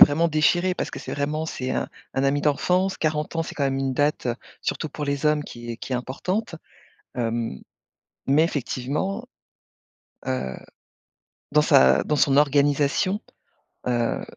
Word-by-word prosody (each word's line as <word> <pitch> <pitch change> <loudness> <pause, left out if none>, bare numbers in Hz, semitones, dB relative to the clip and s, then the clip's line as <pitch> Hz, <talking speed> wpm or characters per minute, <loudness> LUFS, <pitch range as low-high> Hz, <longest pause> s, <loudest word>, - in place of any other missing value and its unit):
vraiment 165 +4 +7
déchiré, 175 +4 +2
parce - - -3
que - - -6
c'est - - -6
vraiment 150 +2 -1
c'est 130 -4 -4
un - - -1 0.3
un 135 - +1
ami 140 +1 +2
d'enfance. 180 +6 +2
40 155 +1 -1
ans, 165 - +1
c'est - - -7
quand 140 - 0
même 135 0 0
une 135 -1 -1
date, 145 -2 +1 0.3
surtout 155 - -2
pour 150 - -5
les 140 +1 -1
hommes, 150 -1 +2
qui 120 -3 -8
est 115 - -7
qui 130 - -6
est - - +2
importante. 165 - -3 0.6
Hem, 115 - -2 0.7
mais 145 +4 +5
effectivement, 150 - -2 1.0
heu, 130 - -2 1.0
dans 150 0 +5
sa 65 - +6
dans 150 - 0
son 140 -1 +3
organisation, 145 +6 +3 0.7
heu, 120 -1 0
145 Hz, 155 wpm, -24 LUFS, 130-155 Hz, 1.0 s, vraiment